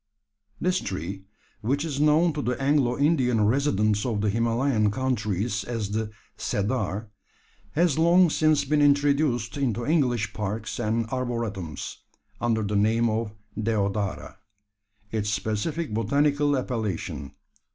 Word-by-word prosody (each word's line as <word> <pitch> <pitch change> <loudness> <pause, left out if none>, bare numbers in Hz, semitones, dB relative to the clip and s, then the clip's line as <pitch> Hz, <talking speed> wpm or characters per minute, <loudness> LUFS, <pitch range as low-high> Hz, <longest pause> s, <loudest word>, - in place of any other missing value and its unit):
This 185 +1 +1
tree, 95 +1 -5 0.4
which 140 +7 0
is 145 -4 -3
known 155 +3 +4
to 145 - -2
the 125 -1 -2
Anglo 135 -3 +2
Indian 130 -7 +3
residents 110 -4 +2
of 110 -5 -1
the 105 -1 +1
Himalayan 115 0 +1
countries 110 -3 -1
as 115 -4 -3
the 110 0 -1 0.3
"cedar," 105 0 -2 0.6
has 160 -2 +2
long 170 +1 +5
since 155 -2 +3
been 150 +1 +2
introduced 140 -3 +2
into 120 -4 -1
English 120 -9 +1
parks 105 +2 -4
and 115 0 0
arboretums, 115 - -3 0.4
under 115 -2 +1
the 105 0 -2
name 110 +3 +3
of 110 -1 -2 0.2
deodara 105 -2 -1 0.7
its 105 -2 -1
specific 110 +8 -2
botanical 145 +6 +2
appellation. 110 - -3
115 Hz, 120 wpm, -26 LUFS, 105-140 Hz, 0.7 s, long